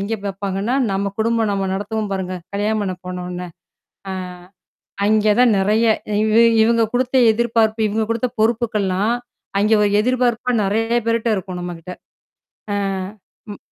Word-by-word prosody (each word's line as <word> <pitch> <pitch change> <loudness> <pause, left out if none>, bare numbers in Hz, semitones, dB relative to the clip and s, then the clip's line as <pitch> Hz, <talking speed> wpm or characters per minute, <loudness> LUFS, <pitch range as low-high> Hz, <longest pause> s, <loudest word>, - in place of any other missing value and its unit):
எங்க 205 +3 -2
பாப்பாங்கன்னா, 195 +3 -2 0.2
நம்ம 195 0 -1
குடும்பம் 225 -1 +1
நாம 195 -1 -1
நடத்துவோம் 210 +1 -3
பாருங்க. 185 -1 -3 0.2
கல்யாணம் 210 +2 0
பண்ணி 190 -2 -2
போன 180 0 -5
உடன 180 0 -6 0.6
அ - - -3 0.9
அங்கே 215 0 +3
தான் 245 -3 +5
நிறைய. 210 +4 +2 0.3
இ 215 +2 +4 0.2
இவுங்க 230 0 +3
குடுத்த 255 +1 0 0.2
எதிர்பார்ப்பு. 225 -1 +1
இவுங்க 220 +2 -1
குடுத்த 230 +2 0
பொறுப்புகள்லாம் 220 -2 +1 0.4
அங்கே 215 +2 +3
ஒரு 205 - +3
எதிர்பார்ப்பா 250 0 0
நிறைய 225 +4 +1
பேர்ட்ட 230 0 +1
இருக்கும் 185 -2 -5
நம்மக்கிட்ட. 175 0 -7 0.8
ஆ, - - 0 0.8
ம் - - -11
215 Hz, 135 wpm, -20 LUFS, 195-230 Hz, 0.9 s, தான்